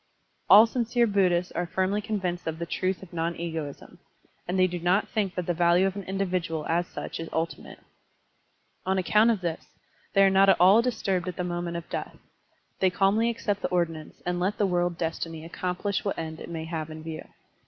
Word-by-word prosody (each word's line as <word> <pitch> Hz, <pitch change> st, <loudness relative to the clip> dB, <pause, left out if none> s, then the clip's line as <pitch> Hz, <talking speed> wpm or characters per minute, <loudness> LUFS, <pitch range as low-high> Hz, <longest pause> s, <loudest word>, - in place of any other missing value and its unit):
All 215 Hz, +2 st, +10 dB
sincere 235 Hz, 0 st, +1 dB
Buddhists 185 Hz, -4 st, +2 dB
are 175 Hz, -, -2 dB
firmly 190 Hz, +4 st, 0 dB
convinced 185 Hz, -5 st, -3 dB
of 160 Hz, 0 st, -2 dB
the 170 Hz, -, -4 dB
truth 185 Hz, +2 st, -2 dB
of 185 Hz, -, -13 dB
non 165 Hz, 0 st, -1 dB
egoism, 160 Hz, -4 st, -6 dB, 0.5 s
and 180 Hz, +2 st, -1 dB
they 185 Hz, -, +5 dB
do 180 Hz, -1 st, -3 dB
not 180 Hz, +4 st, +2 dB
think 205 Hz, -5 st, -2 dB
that 180 Hz, -, -2 dB
the 175 Hz, -, 0 dB
value 175 Hz, +2 st, +4 dB
of 195 Hz, 0 st, -1 dB
an 200 Hz, -2 st, -6 dB
individual 185 Hz, -5 st, -2 dB
as 175 Hz, +2 st, +1 dB
such -, -, -6 dB
is 165 Hz, -, -5 dB
tdti 165 Hz, +1 st, -2 dB
mate. -, -, -12 dB, 1.1 s
On 190 Hz, +1 st, 0 dB
account 210 Hz, +5 st, +4 dB
of 220 Hz, -5 st, +1 dB
this, 170 Hz, -2 st, -3 dB, 0.5 s
they 195 Hz, -, +6 dB
are 195 Hz, -, +6 dB
not 195 Hz, +1 st, +5 dB
at 195 Hz, -, +6 dB
all 195 Hz, +5 st, +7 dB
disturbed 200 Hz, -7 st, -1 dB
at 180 Hz, -, -3 dB
the 180 Hz, -, -3 dB
moment 175 Hz, -1 st, -3 dB
of 170 Hz, -, -7 dB
death; -, -, -5 dB, 0.6 s
they 190 Hz, -, +4 dB
calmly 200 Hz, +5 st, +2 dB
accept 205 Hz, -3 st, -2 dB
the -, -, 0 dB
ordinance 165 Hz, -3 st, -2 dB
and 175 Hz, 0 st, -1 dB
let 190 Hz, +4 st, 0 dB
the 205 Hz, -, +2 dB
world 175 Hz, -2 st, 0 dB
destiny 165 Hz, -1 st, -4 dB
accomplish 180 Hz, +3 st, -2 dB
what 200 Hz, -, -2 dB
end 160 Hz, -1 st, -5 dB
it -, -, -8 dB
may 165 Hz, -1 st, -5 dB
have 160 Hz, -1 st, -4 dB
in 155 Hz, 0 st, -8 dB
view. 160 Hz, -1 st, -6 dB
180 Hz, 205 wpm, -27 LUFS, 170-195 Hz, 1.1 s, All